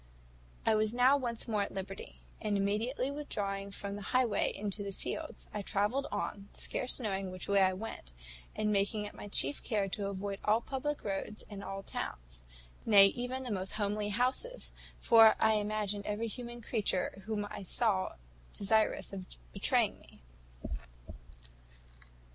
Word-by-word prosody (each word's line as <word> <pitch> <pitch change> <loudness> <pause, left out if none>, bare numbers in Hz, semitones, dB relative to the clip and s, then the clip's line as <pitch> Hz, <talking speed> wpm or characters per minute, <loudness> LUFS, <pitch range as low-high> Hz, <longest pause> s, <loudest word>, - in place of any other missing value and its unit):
"I - - +5
was 215 +1 +2
now 255 +3 +6
once 240 -5 -1
more 215 -3 +1
at 200 - -2
liberty; 195 0 -6 0.2
and 210 -2 +1
immediately 225 +7 0
withdrawing 200 -9 -3
from 200 0 -5
the 205 - -6
highway 245 +1 +2
into 205 0 -3
the 200 -1 -3
fields, 310 +10 -5
I 210 - -2
travelled 210 +8 0
on, 205 -1 -3
scarce 255 - +1
knowing 195 -5 -2
which 185 0 -6
way 200 -1 +4
I 190 0 +5
went, 185 - -7 0.4
and 210 0 +1
making 205 +1 +1
it 205 - -7
my - - -8
chief 245 +7 +1
care 210 -4 0
to 200 +1 -1
avoid 200 0 -3
all 215 +2 +4
public 280 +4 -3
roads 200 +1 -3
and 200 -1 -6
all 195 0 -5
towns - - -5 0.4
nay, 205 -3 +9
even 250 +4 -3
the 250 - -4
most 190 -2 -1
homely 210 0 -1
houses; 255 - 0 0.3
for 225 -2 +8
I 220 - +5
imagined 210 -1 -1
every 210 +2 -1
human 240 +1 -7
creature 200 -4 0
whom 210 -2 -1
I 210 -1 -6
saw 195 0 +1 0.4
desirous 215 0 +2
of 190 -2 -5 0.3
betraying - - +2
me. - - -19
210 Hz, 155 wpm, -33 LUFS, 195-230 Hz, 0.4 s, nay